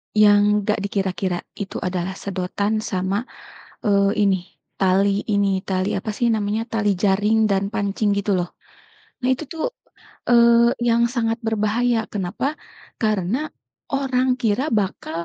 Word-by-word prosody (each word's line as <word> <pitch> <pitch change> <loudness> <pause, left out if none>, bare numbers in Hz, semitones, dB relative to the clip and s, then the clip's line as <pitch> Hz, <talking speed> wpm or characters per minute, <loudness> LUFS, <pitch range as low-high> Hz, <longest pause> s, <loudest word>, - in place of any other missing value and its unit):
Yang 205 -1 +6 0.2
enggak 210 +1 0
dikira-kira 190 -2 -2 0.2
itu 200 - -5
adalah 185 +1 -3
sedotan 200 +3 -2
sama, 195 +2 -2 0.6
eee, 200 -1 +3
ini, 190 -2 +3 0.4
tali 195 +1 +2
ini, 200 -2 +1
tali 190 +1 -1
apa 215 - -4
sih 240 - +2
namanya, 215 0 0
tali 210 -2 +1
jaring 210 +3 +3
dan 195 0 +1
pancing 205 +1 0
gitu 200 0 -1
loh. 175 - -2 0.7
Nah - - +1
itu 275 - -5
tuh, 320 - -2 0.6
eee, 235 0 +6 0.2
yang 235 0 +3
sangat 230 -2 -1
berbahaya, 225 +2 +1
kenapa? 210 +10 -2 0.4
Karena 215 - 0 0.4
orang 260 -2 +1
kira 240 +7 +1
bakal 185 -5 -2
205 Hz, 130 wpm, -22 LUFS, 195-230 Hz, 0.7 s, Yang